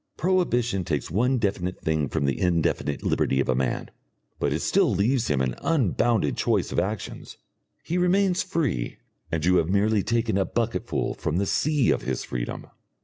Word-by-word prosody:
Prohibition 125 - +1
takes 75 -5 -2
one 125 +8 +2
definite 95 -5 -2
thing 80 -4 0
from - - -1
the 70 -2 0
indefinite 85 -4 0
liberty 65 - +1
of 70 - +1
a 65 - +3
man, 65 0 -2 0.5
but - - 0
it - - -1
still - - +3
leaves 115 +5 +1
him 70 -3 +1
an 65 -1 0
unbounded 120 - +1
choice - - 0
of - - +1
actions. 100 +4 -4 0.5
He 175 +2 -1
remains 185 +1 +2
free, 140 - -2 0.3
and 80 -1 -1
you 90 0 +4
have 80 0 +1
merely 105 +2 +2
taken 115 -2 0
a - - +3
bucketful 115 -1 -2
from 80 +2 -2
the 100 - +1
sea 150 +5 +2
of - - 0
his 65 -1 -3
freedom. - - -5
100 Hz, 175 wpm, -25 LUFS, 80-125 Hz, 0.5 s, you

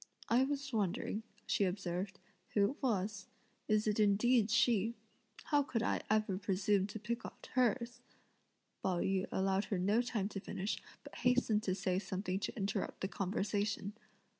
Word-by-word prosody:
"I 245 +3 +5
was 275 -1 -3
wondering," 210 +1 0 0.2
she - - +2
observed, 190 0 -2 0.4
"who 200 +1 +4
it 285 - -12
was. 210 -5 -1 0.4
Is 215 0 +3
it 210 0 +1
indeed 215 +2 +4
she? 230 -1 +3 0.5
How 290 -1 +3
could 235 -5 -1
I - - +1
ever 215 -3 +2
presume 195 0 +2
to 220 - -6
pick 235 +3 -3
out - - -10
hers?" 245 0 +1 0.8
Pao 185 -2 +1
yü 190 -1 +1
allowed 195 +1 +1
her 200 - -1
no 200 +6 +3
time 225 -5 -1
to 200 - -4
finish, 195 +1 -3 0.2
but - - -11
hastened 250 -4 +3
to 185 -3 0
say 185 -1 0
something 190 -1 -2
to 205 - -4
interrupt 200 -1 -2
the 190 - 0
conversation. 200 +1 -1
205 Hz, 160 wpm, -35 LUFS, 195-235 Hz, 0.8 s, I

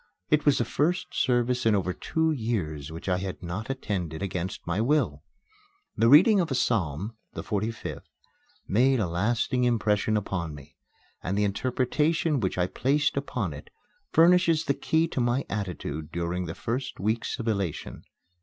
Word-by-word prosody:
It 150 0 +3
was 145 - +5
the 120 - +1
first 175 +10 0
service 125 0 +1
in 110 -2 +4
over 95 -2 0
two 160 - 0
years 90 - -2
which 80 +4 -8
I 90 -1 +1
had 95 -1 -5
not 90 +7 -5
attended 95 - -3
against 90 -1 -4
my 90 +4 0
will. 120 - +1 0.7
The 115 - +3
reading 190 - +7
of 170 - +1
a 135 - -1
psalm 100 - 0 0.2
the - - -5
45th 110 +2 -3 0.6
made 130 +5 +3
a 105 - +1
lasting 115 +8 0
impression 110 -3 +2
upon 85 -6 -3
me, 75 +1 -14 0.5
and 95 +3 -2
the 105 - +2
interpretation 135 +8 +1
which 95 -5 -1
I 90 - +2
placed 145 +10 +1
upon 125 - -2
it 75 - -10 0.4
furnishes 165 -1 +5
the 140 - +2
key 160 +4 +1
to 130 - -1
my 120 +3 +1
attitude 90 -6 -4
during 85 +1 -2
the 80 - -5
first 125 +3 -4
weeks 110 +4 -1
of 115 - -5
elation. 100 -7 -2
110 Hz, 165 wpm, -27 LUFS, 90-135 Hz, 0.7 s, reading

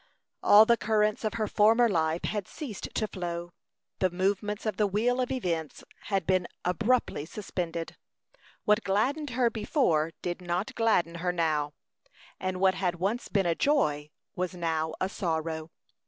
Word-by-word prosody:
All 210 +2 +8
the 235 +1 +4
currents 215 0 +1
of 215 +1 -1
her 215 -2 0
former 225 +4 +4
life 165 -4 0
had 205 -3 -2
ceased 255 - -6
to 215 - 0
flow; 175 -3 -5 0.5
the 185 - +3
movements 200 +4 -1
of 215 - -1
the 210 - +3
wheel 235 +6 +1
of 250 - -1
events 170 - -2 0.2
had 195 -4 0
been 185 0 +2 0.2
abruptly 215 -2 +1
suspended. 170 -2 -5 0.7
What 210 +2 +3
gladdened 270 +10 0
her 245 -1 +2
before 180 - +1
did 175 +1 -3
not 180 +3 -2
gladden 195 -8 +2
her 180 0 +1
now, 155 -4 0 0.7
and 185 -1 -2
what 190 0 +4
had 180 -2 -1
once 200 +8 -2
been 195 -3 +1
a 170 - +3
joy 150 - +1 0.3
was 185 -1 -2
now 160 -2 -1
a 185 - +1
sorrow. 160 -4 -3
190 Hz, 155 wpm, -28 LUFS, 170-215 Hz, 0.7 s, All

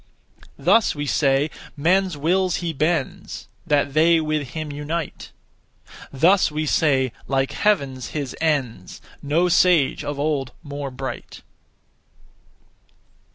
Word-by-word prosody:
Thus 205 +2 +3
we 145 0 -3
say, 140 +1 +1 0.3
'Men's 180 +2 +2
wills 180 +4 +1
he 170 -2 -3
bends, 155 0 -2 0.2
That 145 -1 +1
they 165 +2 +4
with 155 -3 -2
him 155 -2 -4
unite.' 150 +3 -5 0.8
Thus 170 +7 +3
we 155 +1 -2
say, 135 -4 +2 0.2
'Like 135 -1 0
Heaven's 140 - 0
his 145 -4 -5
ends, 135 - -1 0.2
No 160 +5 +1
sage 175 -4 +3
of 145 -1 -4
old 145 -3 -1
more 145 -1 -5
bright.' 130 0 -7
150 Hz, 110 wpm, -22 LUFS, 140-170 Hz, 0.8 s, they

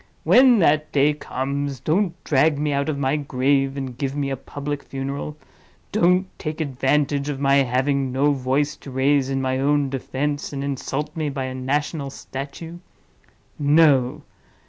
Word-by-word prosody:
When 255 -2 +6
that 155 -4 +2
day 145 +1 +3
comes, 140 -1 -3
don't 175 - 0
drag 150 +1 +3
me 150 0 0
out 140 +2 0
of 150 - -1
my 140 +1 +1
grave 135 0 0
and 130 -3 -5
give 135 +1 -3
me 140 -1 -1
a - - 0
public 145 +2 -5
funeral; 140 +2 -5 0.5
don't 180 -1 +3
take 155 0 -4
advantage 140 0 0
of 140 -2 -3
my 140 0 +3
having 135 +1 +1
no 140 +3 +2
voice 140 +2 0
to - - -11
raise 135 +1 +2
in 135 -1 -1
my 130 0 0
own 140 0 +1
defense, 145 +2 -3
and 140 0 -3
insult 140 +2 -3
me 155 -2 -1
by 135 -1 -3
a 130 0 -4
national 140 +3 -2
statue. 145 +6 -8 0.8
No! 145 -2 +3
140 Hz, 160 wpm, -22 LUFS, 135-150 Hz, 0.8 s, When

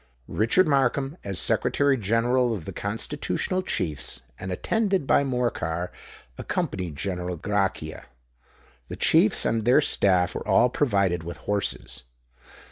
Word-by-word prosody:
Richard 115 - +2
Markham, 135 0 +1
as 100 -2 -4
Secretary 145 - +2
General 120 +2 +1
of 90 -7 -8
the 95 - -6
Constitutional 140 - -2
Chiefs, 85 - -3 0.2
and 95 - -5
attended 195 - 0
by 140 - +3
Morcar, 120 -10 -2 0.5
accompanied 90 -5 -3
General 90 +1 -3
Grachia. 95 -4 -2 0.8
The - - -6
chiefs - - +3
and 115 - +1
their 125 +6 +5
staff 95 - +2
were - - -6
all 125 - +4
provided 100 - +1
with 85 0 -7
horses. 100 -10 -3
105 Hz, 125 wpm, -25 LUFS, 90-135 Hz, 0.8 s, their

